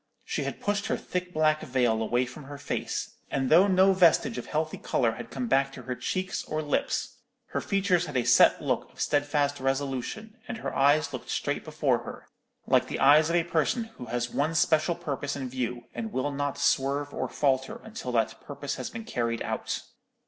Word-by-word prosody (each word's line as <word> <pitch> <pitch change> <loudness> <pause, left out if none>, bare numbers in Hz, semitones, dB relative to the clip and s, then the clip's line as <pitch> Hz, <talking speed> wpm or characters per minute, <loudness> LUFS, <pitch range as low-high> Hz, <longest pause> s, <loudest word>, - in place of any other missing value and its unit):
She - - -2
had - - -4
pushed 205 0 -1
her - - 0
thick 180 0 -4
black 155 -1 +2
veil 120 -3 +1
away 120 +3 +1
from 130 +3 -10
her 145 +1 -8
face, 140 - -4
and 135 0 -1
though 180 +5 +7
no 190 0 +5
vestige 190 +5 +4
of - - -8
healthy 155 +1 -2
colour 115 -3 +1
had 115 +1 -8
come 130 -3 -3
back 135 +2 +2
to - - -9
her 130 - -3
cheeks 185 +8 -2
or 155 0 -2
lips, 145 - -1 0.3
her - - -2
features 185 -3 +1
had 145 -3 -2
a 125 - +2
set 120 0 +5
look - - -1
of - - -20
steadfast 145 -1 +1
resolution, 135 - -3
and 245 - -4
her - - -5
eyes 145 +1 +3
looked 130 - -7
straight - - -1
before - - +1
her, - - -9 0.4
like - - +3
the - - -4
eyes 150 +3 +6
of 170 - +1
a 170 - +3
person 175 +8 0
who 125 - -6
has 120 +1 -2
one 155 +3 0
special 160 +1 +3
purpose 140 -2 -3
in 135 -2 -4
view, 125 -1 -3
and 225 -1 -4
will 145 -1 -1
not 145 0 -2
swerve 140 +2 +1
or - - -2
falter 135 -2 0
until 220 - -6
that 115 -1 0
purpose 145 -1 -5
has - - -4
been 225 -1 -7
carried 115 - -2
out. - - -3
145 Hz, 200 wpm, -28 LUFS, 130-170 Hz, 0.4 s, though